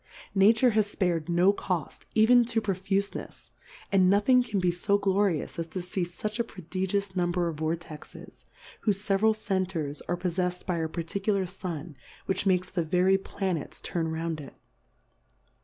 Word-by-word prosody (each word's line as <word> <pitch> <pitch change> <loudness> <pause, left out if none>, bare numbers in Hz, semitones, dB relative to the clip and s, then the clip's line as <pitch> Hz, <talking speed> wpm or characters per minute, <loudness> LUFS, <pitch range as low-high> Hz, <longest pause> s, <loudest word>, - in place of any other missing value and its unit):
Nature 220 +5 +5
has 215 -1 0
fpar'd 175 -4 0
no 175 +3 +4
Coft, 180 -7 -4
even 240 +3 +6
to 230 -1 0
profufenefs, 195 -1 -3 0.4
and 190 -2 +5
no 200 +1 +5
thing 250 +4 +5
can 210 -5 -1
be 180 -1 +2
fo 200 +4 +1
glorious, 195 -5 0
as 165 - -2
to 175 +3 -5
fee 180 +1 -3
fucli 210 +6 -4
a - - +3
prodigious 190 0 -3
Number 175 -1 +1
of 165 -2 -4
Vortexes, 160 -1 -6 0.4
whofe 205 -2 +4
feveral 205 +2 +2
Centers 185 -8 -2
are 175 - 0
poffefsM 180 0 -2
by 175 -3 -1
a 160 -1 -1
parti 170 +4 -4
cular 195 -2 +1
Sun, 175 -4 -6 0.3
which 190 +1 0
makes 180 -1 +2
the 175 -2 0
very 180 +4 +3
Pla 195 -1 -2
nets 160 - -5
turn 165 -2 -2
round 160 -1 -3
it. 135 - -11
185 Hz, 165 wpm, -28 LUFS, 170-200 Hz, 0.4 s, even